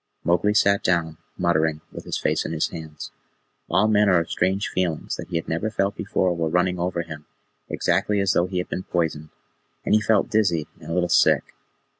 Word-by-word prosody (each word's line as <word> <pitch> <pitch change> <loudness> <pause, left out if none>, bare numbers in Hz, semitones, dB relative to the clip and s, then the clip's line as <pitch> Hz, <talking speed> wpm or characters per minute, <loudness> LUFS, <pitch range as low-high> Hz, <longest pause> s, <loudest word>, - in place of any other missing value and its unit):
Mowgli 105 +4 +2
sat 100 -1 +4
down, 85 -3 0 0.2
muttering, 80 -3 +1
with - - -9
his - - -2
face - - 0
in - - -4
his 80 - 0
hands. 80 -3 -8 0.6
All 95 +5 +3
manner 105 -3 +4
of 85 -1 -1
strange 95 +3 0
feelings 90 -4 -2
that - - -7
he 90 - -6
had 85 - -2
never 85 +7 -1
felt 100 -2 -1
before 95 -3 0
were 80 -1 -1
running 90 +1 +1
over 85 -1 -1
him, 80 -2 -10 0.4
exactly 100 +4 +1
as 100 -1 +2
though 85 - +2
he 90 0 -4
had 90 - -2
been - - -3
poisoned, 80 -4 -2 0.6
and - - +1
he 110 - +5
felt 105 -1 +2
dizzy 95 -8 +1
and - - -11
a - - -2
little 90 -1 +1
sick. - - +3
90 Hz, 200 wpm, -23 LUFS, 80-100 Hz, 0.6 s, he